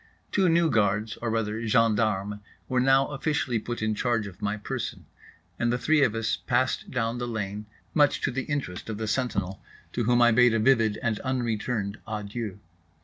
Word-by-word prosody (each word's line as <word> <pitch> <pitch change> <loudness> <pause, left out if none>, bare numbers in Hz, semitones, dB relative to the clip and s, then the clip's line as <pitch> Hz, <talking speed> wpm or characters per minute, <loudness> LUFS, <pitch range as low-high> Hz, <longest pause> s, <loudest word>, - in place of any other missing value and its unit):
Two 190 -3 +3
new 165 -1 +3
guards—or 110 +1 0
rather 110 0 -1
gendarmes—were 105 +1 0
now 135 +1 +4
officially 135 -4 -1
put 120 +1 -5
in 110 0 +1
charge 115 -1 0
of 95 -3 -10
my 105 +1 -1
person; 105 - -5 0.5
and 120 -1 +1
the 120 - +1
three 155 +4 +3
of 115 -5 +2
us 115 -1 0
passed 130 +1 0
down 120 -1 -1
the 120 - -3
lane, 105 -2 -4 0.3
much 145 -2 +4
to - - 0
the 135 +1 -3
interest 130 -11 -4
of 110 - -3
the 110 0 -3
sentinel, 100 -6 -1 0.3
to 120 - -1
whom 120 +1 +3
I 120 -1 +6
bade 120 0 +5
a - - +2
vivid 115 -3 +3
and 115 -3 0
unreturned 115 -4 -2
adieu. 105 -1 -4
115 Hz, 175 wpm, -27 LUFS, 105-125 Hz, 0.5 s, I